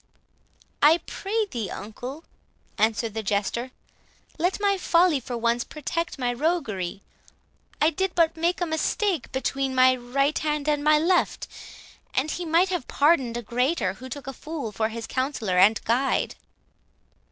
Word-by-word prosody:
"I 305 Hz, +3 st, +7 dB
pray 430 Hz, +2 st, -2 dB
thee, 235 Hz, -, -4 dB
uncle," 245 Hz, -, -7 dB, 0.6 s
answered 220 Hz, 0 st, +1 dB
the 220 Hz, -, -2 dB
Jester, 210 Hz, +4 st, -1 dB, 0.7 s
"let 360 Hz, +5 st, +1 dB
my 405 Hz, -1 st, +2 dB
folly, 340 Hz, -4 st, +3 dB
for 245 Hz, -1 st, -5 dB
once, 235 Hz, +1 st, +1 dB
protect 330 Hz, +3 st, -4 dB
my 245 Hz, -2 st, 0 dB
roguery. 235 Hz, -, -2 dB, 0.8 s
I 305 Hz, +2 st, +4 dB
did 380 Hz, +3 st, -2 dB
but 330 Hz, -1 st, +3 dB
make 340 Hz, +3 st, 0 dB
a -, -, +2 dB
mistake 335 Hz, -, -1 dB
between 270 Hz, 0 st, -1 dB
my 255 Hz, 0 st, +6 dB
right 275 Hz, +4 st, 0 dB
hand 300 Hz, -1 st, -1 dB
and 295 Hz, -1 st, +1 dB
my 305 Hz, 0 st, +5 dB
left; 350 Hz, +4 st, +1 dB, 0.7 s
and 285 Hz, +4 st, +1 dB
he 355 Hz, -, -4 dB
might 335 Hz, +3 st, +3 dB
have 355 Hz, -8 st, -2 dB
pardoned 280 Hz, -6 st, +2 dB
a 240 Hz, -, -5 dB
greater, 250 Hz, -, 0 dB
who 260 Hz, +6 st, -10 dB
took 280 Hz, +2 st, -7 dB
a 270 Hz, -, -5 dB
fool 300 Hz, -6 st, -6 dB
for 220 Hz, +1 st, -1 dB
his 225 Hz, 0 st, -6 dB
counsellor 255 Hz, -9 st, -1 dB
and 210 Hz, +4 st, +6 dB
guide." 250 Hz, +4 st, +1 dB
275 Hz, 150 wpm, -25 LUFS, 235-330 Hz, 0.8 s, I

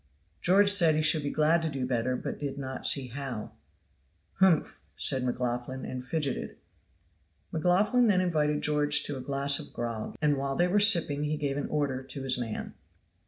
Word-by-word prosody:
George 200 Hz, +3 st, +5 dB
said 170 Hz, -6 st, +6 dB
he 155 Hz, -, 0 dB
should 155 Hz, 0 st, +4 dB
be 145 Hz, -, -3 dB
glad 155 Hz, +3 st, +1 dB
to 160 Hz, -, -2 dB
do 135 Hz, -3 st, -4 dB
better, 125 Hz, 0 st, -2 dB
but -, -, -6 dB
did 140 Hz, -1 st, -5 dB
not 130 Hz, -1 st, -1 dB
see 135 Hz, -3 st, +3 dB
how. 130 Hz, -4 st, -7 dB, 0.9 s
"Humph!" 190 Hz, -5 st, +2 dB
said 130 Hz, -2 st, 0 dB
McLaughlan, 125 Hz, +1 st, -4 dB
and 125 Hz, 0 st, -6 dB
fidgeted. 140 Hz, 0 st, -4 dB, 0.9 s
McLaughlan 195 Hz, +9 st, +1 dB
then 195 Hz, -4 st, +2 dB
invited 150 Hz, -5 st, -1 dB
George 145 Hz, -1 st, +2 dB
to 145 Hz, -, -5 dB
a -, -, -7 dB
glass 140 Hz, +1 st, +1 dB
of -, -, -10 dB
grog, 115 Hz, -2 st, -6 dB
and 150 Hz, -2 st, +1 dB
while 135 Hz, 0 st, -3 dB
they 175 Hz, +3 st, +1 dB
were 200 Hz, +3 st, +1 dB
sipping 170 Hz, -8 st, +5 dB
he 150 Hz, +1 st, -2 dB
gave 140 Hz, -2 st, -3 dB
an 145 Hz, -, -4 dB
order 140 Hz, -4 st, -2 dB
to 135 Hz, +1 st, -9 dB
his 130 Hz, -2 st, +2 dB
man. 115 Hz, -3 st, -6 dB
145 Hz, 180 wpm, -27 LUFS, 130-160 Hz, 0.9 s, said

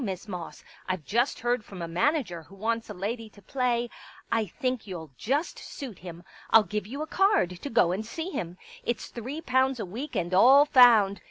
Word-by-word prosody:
Miss 190 Hz, -2 st, -4 dB
Moss. 180 Hz, -4 st, -7 dB, 0.3 s
I've 185 Hz, -5 st, -2 dB
just 240 Hz, +5 st, 0 dB
heard 240 Hz, -1 st, 0 dB
from 195 Hz, -3 st, -11 dB
a -, -, -3 dB
manager 180 Hz, -, 0 dB
who 185 Hz, +5 st, -16 dB
wants 225 Hz, +3 st, -2 dB
a -, -, -5 dB
lady 220 Hz, +4 st, -4 dB
to 210 Hz, -, -18 dB
play.... 240 Hz, +2 st, -1 dB, 0.4 s
I 225 Hz, -2 st, +1 dB
think 255 Hz, +5 st, -3 dB
you'll 165 Hz, -6 st, -7 dB
just 285 Hz, -, -1 dB
suit 250 Hz, -9 st, -8 dB
him. 175 Hz, -1 st, -9 dB, 0.3 s
I'll 225 Hz, -1 st, +7 dB
give 210 Hz, +1 st, -4 dB
you 280 Hz, +6 st, -4 dB
a -, -, -4 dB
card 315 Hz, -, +2 dB
to 285 Hz, -, -5 dB
go 185 Hz, -8 st, +3 dB
and 195 Hz, +4 st, -2 dB
see 320 Hz, +11 st, -5 dB
him. 175 Hz, -, -5 dB, 0.3 s
It's 240 Hz, -, -3 dB
three 260 Hz, +7 st, -6 dB
pounds 260 Hz, -3 st, +1 dB
a 215 Hz, -, -2 dB
week 240 Hz, +11 st, -6 dB
and 175 Hz, +1 st, -1 dB
all 265 Hz, +9 st, +7 dB
found. 225 Hz, -8 st, +6 dB
225 Hz, 200 wpm, -27 LUFS, 185-255 Hz, 0.4 s, I'll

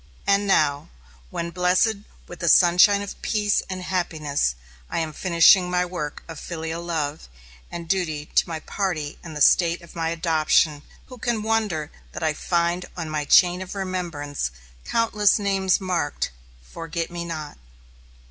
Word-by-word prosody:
And 200 Hz, 0 st, +2 dB
now, 150 Hz, -5 st, +2 dB, 0.4 s
when 170 Hz, -, -4 dB
blessed 180 Hz, +5 st, +2 dB, 0.3 s
with 175 Hz, -, -10 dB
the 170 Hz, -, +1 dB
sunshine 185 Hz, +4 st, +6 dB
of 200 Hz, -, -9 dB
peace 210 Hz, -2 st, +1 dB
and 185 Hz, -1 st, -5 dB
happiness, 155 Hz, -, -1 dB, 0.3 s
I -, -, -3 dB
am 160 Hz, -2 st, -2 dB
finishing 180 Hz, +2 st, +5 dB
my 180 Hz, 0 st, +1 dB
work 175 Hz, -5 st, -5 dB
of 165 Hz, -2 st, -8 dB
filial 165 Hz, 0 st, -5 dB
love 160 Hz, -3 st, -3 dB, 0.4 s
and 170 Hz, -1 st, -7 dB
duty 160 Hz, -5 st, -1 dB
to -, -, +1 dB
my 160 Hz, -1 st, -4 dB
party 165 Hz, -8 st, -3 dB
and 160 Hz, -3 st, -8 dB
the -, -, -5 dB
State 170 Hz, +3 st, +4 dB
of 170 Hz, -, -15 dB
my 165 Hz, -1 st, -1 dB
adoption, 160 Hz, -2 st, +2 dB, 0.2 s
who 255 Hz, -2 st, -12 dB
can 230 Hz, -2 st, -1 dB
wonder 210 Hz, -9 st, -1 dB, 0.2 s
that -, -, -5 dB
I 155 Hz, -1 st, +2 dB
find 175 Hz, +2 st, -1 dB
on 165 Hz, -3 st, -4 dB
my 150 Hz, -1 st, -2 dB
chain 180 Hz, +3 st, +5 dB
of 190 Hz, +1 st, -7 dB
remembrance 170 Hz, -, -3 dB, 0.4 s
countless 215 Hz, -3 st, +2 dB
names 195 Hz, -2 st, +1 dB
marked, 180 Hz, -6 st, -2 dB, 0.3 s
"forget 165 Hz, -, -5 dB
me 170 Hz, 0 st, -4 dB
not"? 155 Hz, -, -6 dB
170 Hz, 155 wpm, -23 LUFS, 155-185 Hz, 0.4 s, sunshine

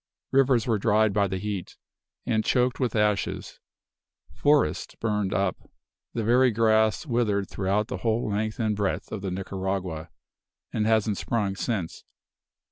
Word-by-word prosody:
Rivers 130 Hz, -4 st, +3 dB
were 115 Hz, -4 st, +1 dB
dried 110 Hz, 0 st, +3 dB
by 100 Hz, 0 st, +2 dB
the 95 Hz, 0 st, -3 dB
heat, 100 Hz, -1 st, -5 dB, 0.5 s
and 110 Hz, -3 st, +1 dB
choked 125 Hz, +1 st, +1 dB
with 125 Hz, -4 st, 0 dB
ashes; 105 Hz, -1 st, 0 dB, 0.7 s
forests 145 Hz, 0 st, +1 dB
burned 105 Hz, -4 st, -1 dB
up; 95 Hz, -2 st, -1 dB, 0.5 s
the 115 Hz, -, -1 dB
very 125 Hz, +4 st, +4 dB
grass 110 Hz, 0 st, +2 dB
withered 110 Hz, -7 st, 0 dB
throughout 100 Hz, +2 st, -1 dB
the -, -, -4 dB
whole 110 Hz, -1 st, 0 dB
length 110 Hz, +2 st, -2 dB
and 110 Hz, -2 st, +1 dB
breadth 100 Hz, -2 st, -2 dB
of 105 Hz, -, -4 dB
Nicaragua, 95 Hz, -3 st, -3 dB, 0.6 s
and 110 Hz, 0 st, 0 dB
hasn't 110 Hz, -2 st, +2 dB
sprung 105 Hz, -4 st, -1 dB
since. 95 Hz, -6 st, -3 dB
105 Hz, 135 wpm, -26 LUFS, 100-115 Hz, 0.7 s, very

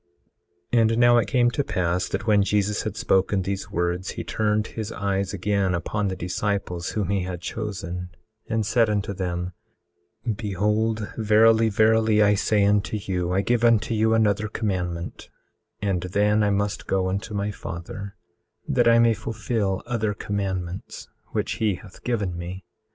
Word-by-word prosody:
18:26 120 Hz, -, +5 dB
And 115 Hz, 0 st, +2 dB
now 120 Hz, 0 st, +6 dB
it 105 Hz, -, 0 dB
came 120 Hz, +2 st, +3 dB
to 145 Hz, -, 0 dB
pass 90 Hz, -6 st, 0 dB
that 95 Hz, -, -3 dB
when 105 Hz, -2 st, +4 dB
Jesus 105 Hz, +1 st, +1 dB
had 110 Hz, 0 st, -4 dB
spoken 95 Hz, -3 st, +2 dB
these 95 Hz, +1 st, -3 dB
words, 85 Hz, +2 st, -1 dB
he -, -, -5 dB
turned 105 Hz, 0 st, 0 dB
his 110 Hz, -2 st, -5 dB
eyes 100 Hz, -1 st, -1 dB
again 100 Hz, -1 st, 0 dB
upon 100 Hz, +4 st, -2 dB
the 95 Hz, -, -2 dB
disciples 90 Hz, -1 st, -2 dB
whom 100 Hz, -4 st, -2 dB
he 100 Hz, -1 st, +1 dB
had 90 Hz, -1 st, -4 dB
chosen, 90 Hz, -3 st, -5 dB, 0.4 s
and 110 Hz, -1 st, 0 dB
said 115 Hz, +1 st, +3 dB
unto 100 Hz, -1 st, -1 dB
them: 90 Hz, -1 st, -3 dB, 0.7 s
18:27 110 Hz, -4 st, -1 dB
Behold 105 Hz, +1 st, 0 dB
verily, 110 Hz, +1 st, +5 dB
verily, 110 Hz, 0 st, +4 dB
I 105 Hz, 0 st, +5 dB
say 105 Hz, 0 st, +2 dB
unto 100 Hz, +1 st, +2 dB
you, 90 Hz, -3 st, -2 dB
I 95 Hz, +2 st, +2 dB
give 120 Hz, +2 st, +1 dB
unto 115 Hz, -1 st, +3 dB
you 110 Hz, +1 st, +3 dB
another 110 Hz, -1 st, +2 dB
commandment, 90 Hz, -6 st, -3 dB, 0.5 s
and 95 Hz, -4 st, 0 dB
then 105 Hz, +4 st, +2 dB
I 105 Hz, -, +3 dB
must 100 Hz, 0 st, -1 dB
go 95 Hz, -1 st, +1 dB
unto 100 Hz, +3 st, -3 dB
my 100 Hz, +1 st, -1 dB
Father 100 Hz, +2 st, -7 dB, 0.5 s
that -, -, +2 dB
I 115 Hz, 0 st, +6 dB
may 115 Hz, -1 st, +5 dB
fulfil 105 Hz, -2 st, -2 dB
other 110 Hz, -3 st, -1 dB
commandments 95 Hz, -3 st, -4 dB, 0.2 s
which -, -, -2 dB
he 105 Hz, -3 st, +2 dB
hath 95 Hz, +1 st, -14 dB
given 105 Hz, -8 st, -1 dB
me. 90 Hz, +1 st, -7 dB
100 Hz, 165 wpm, -24 LUFS, 95-110 Hz, 0.7 s, now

